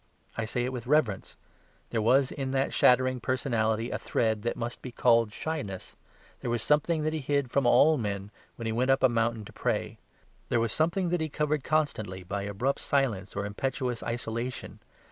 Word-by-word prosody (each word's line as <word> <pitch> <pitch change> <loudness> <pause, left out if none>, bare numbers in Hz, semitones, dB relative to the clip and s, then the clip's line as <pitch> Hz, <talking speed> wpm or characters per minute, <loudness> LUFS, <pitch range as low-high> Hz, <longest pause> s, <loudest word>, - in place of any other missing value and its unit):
I 115 - -2
say 120 +2 -1
it 130 - -3
with 120 -1 -6
reverence; 125 -10 +1 0.6
there 115 - 0
was 130 +4 +4
in 135 -2 -3
that 135 0 0
shattering 130 0 +4
personality 115 -3 0
a - - -2
thread 110 -2 0
that 120 +2 -1
must 120 0 -4
be 125 - -7
called 115 -2 +3
shyness. 105 - -5 0.4
There - - -4
was 120 -1 0
something 155 +2 +2
that 155 +1 0
He 160 - -1
hid 140 -2 -1
from 140 -3 +2
all 155 +5 +5
men 100 -2 -3 0.2
when 115 - -7
He 110 - 0
went 125 +4 0
up 135 0 +3
a 130 - +7
mountain 115 -1 0
to - - -12
pray. - - -2 0.5
There 120 - +2
was 115 -2 0
something 170 - +1
that 175 -1 0
He 160 - -1
covered 150 -1 -1
constantly 110 - -1
by 100 +3 -3
abrupt 110 +7 -1
silence 115 -9 0
or 100 0 -2
impetuous 125 +3 -2
isolation. 115 +1 -4
120 Hz, 190 wpm, -28 LUFS, 110-140 Hz, 0.6 s, a